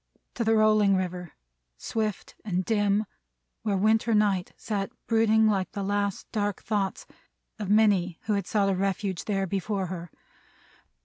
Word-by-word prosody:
To 235 - -2
the 225 0 +3
rolling 215 -2 +4
River, 180 -2 -3 0.4
swift 215 - -3
and 185 -3 -1
dim, 205 -1 +2 0.6
where 205 -3 0
Winter 220 +3 +2
Night 200 -4 +2
sat 200 -3 -3 0.2
brooding 220 -1 +3
like 195 -3 +1
the 200 - -3
last 200 0 -1
dark 205 -3 -2
thoughts 205 -3 -2 0.5
of 205 -3 -4
many 200 -5 +3
who 215 - 0
had 200 -3 -1
sought 200 -2 +2
a - - 0
refuge 195 -1 -2
there 195 -2 0
before 195 +1 -2
her. 175 -1 -7
205 Hz, 145 wpm, -27 LUFS, 190-215 Hz, 0.6 s, rolling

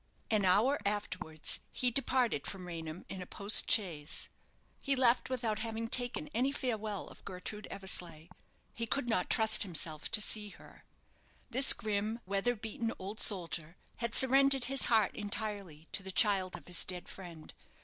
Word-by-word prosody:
An 210 -3 +2
hour 220 +10 +3
afterwards 180 -6 -2
he 250 -1 0
departed 250 - +1
from 190 -2 -7
Raynham 165 -1 -7
in 190 - -7
a 180 - -8
post 200 +2 +2
chaise. 165 -8 +1 0.5
He 275 - -1
left 255 -1 +2
without 230 -4 -2
having 225 0 -4
taken 245 +5 0
any 265 -1 0
farewell 220 -7 -4
of - - -16
Gertrude 200 +3 -6
Eversleigh. 175 -4 -2 0.4
He 230 0 -4
could 260 +2 -2
not 220 -6 0
trust 220 -2 +4
himself 160 -4 +1
to - - +4
see 210 0 0
her. - - -17 0.7
This 260 +3 +8
grim, 215 +2 -3
weather 200 +6 -1
beaten 225 +1 -4
old 200 +3 -7
soldier 170 -4 0 0.2
had 235 -1 -3
surrendered 270 0 +6
his 270 +1 +1
heart 220 -4 +2
entirely 205 -6 -4
to - - +1
the 190 0 -7
child 190 -2 +2
of - - -11
his 180 -1 +2
dead 180 -1 -4
friend. 170 -5 -11
210 Hz, 160 wpm, -32 LUFS, 180-235 Hz, 0.7 s, This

